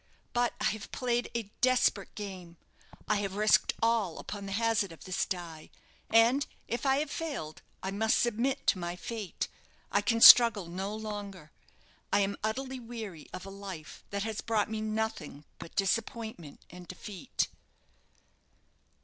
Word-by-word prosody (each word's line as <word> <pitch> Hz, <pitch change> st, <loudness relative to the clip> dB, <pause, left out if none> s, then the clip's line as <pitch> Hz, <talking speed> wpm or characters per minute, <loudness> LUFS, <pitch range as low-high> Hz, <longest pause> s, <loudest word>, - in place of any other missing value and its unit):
But 240 Hz, 0 st, +1 dB
I -, -, -3 dB
have 215 Hz, -1 st, -7 dB
played 245 Hz, -1 st, -1 dB
a 220 Hz, -3 st, -3 dB
desperate 250 Hz, -5 st, +2 dB
game 185 Hz, -5 st, -7 dB, 0.5 s
I 210 Hz, -, +2 dB
have 200 Hz, -1 st, -3 dB
risked 215 Hz, +1 st, +4 dB
all 225 Hz, -7 st, +2 dB
upon 200 Hz, -1 st, -6 dB
the -, -, -5 dB
hazard 220 Hz, -3 st, +1 dB
of 165 Hz, -, -12 dB
this 185 Hz, -1 st, -1 dB
die 170 Hz, -4 st, -6 dB, 0.4 s
and 235 Hz, +5 st, +4 dB, 0.2 s
if 240 Hz, +4 st, -2 dB
I 265 Hz, -, +5 dB
have 295 Hz, 0 st, -1 dB
failed 280 Hz, -, -5 dB, 0.2 s
I 190 Hz, -, -2 dB
must 220 Hz, +3 st, +2 dB
submit 240 Hz, +3 st, 0 dB
to 185 Hz, -, +3 dB
my 175 Hz, 0 st, -3 dB
fate. 210 Hz, +1 st, -4 dB, 0.4 s
I 205 Hz, -, +3 dB
can 230 Hz, +2 st, +1 dB
struggle 230 Hz, -5 st, +10 dB
no 190 Hz, +5 st, -4 dB
longer; 205 Hz, -7 st, -6 dB, 0.6 s
I -, -, +4 dB
am 200 Hz, 0 st, 0 dB
utterly 260 Hz, +4 st, -2 dB
weary 225 Hz, -9 st, -8 dB
of 185 Hz, -, -7 dB
a 195 Hz, -, -8 dB
life 195 Hz, -6 st, -9 dB
that 200 Hz, 0 st, -2 dB
has 220 Hz, -1 st, -3 dB
brought 220 Hz, -2 st, 0 dB
me 220 Hz, -1 st, -2 dB
nothing 215 Hz, -9 st, -3 dB
but 170 Hz, -, -10 dB
disappointment 215 Hz, -5 st, -2 dB
and 180 Hz, 0 st, -11 dB
defeat." 185 Hz, +1 st, -3 dB
210 Hz, 155 wpm, -30 LUFS, 190-230 Hz, 0.6 s, struggle